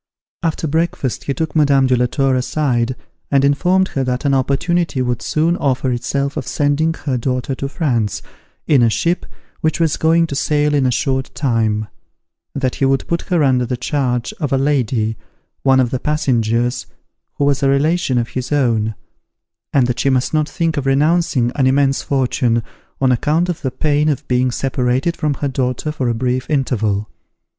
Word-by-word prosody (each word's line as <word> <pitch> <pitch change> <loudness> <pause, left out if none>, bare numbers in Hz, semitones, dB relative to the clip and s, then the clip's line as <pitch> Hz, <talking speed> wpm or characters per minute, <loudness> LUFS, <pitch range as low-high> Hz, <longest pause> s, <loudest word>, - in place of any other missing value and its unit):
After 165 -1 -1
breakfast, 160 -4 -1
he 140 - -1
took 160 +1 -3
Madame 140 -3 +4
de 130 -1 +3
la 125 0 +2
Tour 135 +1 +1
aside 130 -2 0 0.3
and 140 -1 +3
informed 180 +7 +2
her 135 - -2
that 125 +2 -2
an 140 - +2
opportunity 140 +4 0
would 125 -2 -1
soon 165 +3 +1
offer 130 -1 0
itself 140 +3 -2
of 130 - -4
sending 145 +4 +1
her 130 -4 0
daughter 125 +2 -2
to 135 +1 -4
France, 120 - -1 0.4
in 140 -4 +4
a 115 - +4
ship 170 +10 -1 0.3
which 160 +1 0
was 165 -3 +1
going 165 +1 +3
to 145 - -5
sail 150 +1 +1
in 140 -3 +2
a - - +1
short 130 +2 -1
time; 110 -5 0 0.7
that 130 -3 -1
he - - +4
would 135 0 +1
put 170 0 -1
her 175 -4 +2
under 130 -2 +3
the 125 +1 -2
charge 125 -2 -1
of 145 - -2
a 135 - +3
lady, 125 -6 0 0.4
one 135 -1 +4
of 125 -2 +2
the 130 - -1
passengers, 120 -4 0 0.5
who 145 - 0
was 140 0 +1
a 135 - +3
relation 140 -1 +1
of 120 -1 -1
his 130 +1 -5
own; 115 -6 +1 0.8
and 135 -3 +3
that 125 0 -2
she 140 - +2
must 130 +2 +1
not 155 -1 +1
think 165 -1 -1
of 140 -1 -1
renouncing 145 -3 +2
an 135 -3 +2
immense 135 0 +2
fortune, 125 -3 0 0.4
on 130 -1 +3
account 155 +8 +1
of 175 - -3
the 130 - -1
pain 150 +3 +1
of 145 0 -2
being 125 0 +2
separated 130 +5 0
from 150 -3 -1
her 145 - -2
daughter 130 +2 -2
for 135 -5 -2
a 115 - 0
brief 125 +2 -1
interval. 110 -8 0
135 Hz, 185 wpm, -18 LUFS, 125-150 Hz, 0.8 s, Madame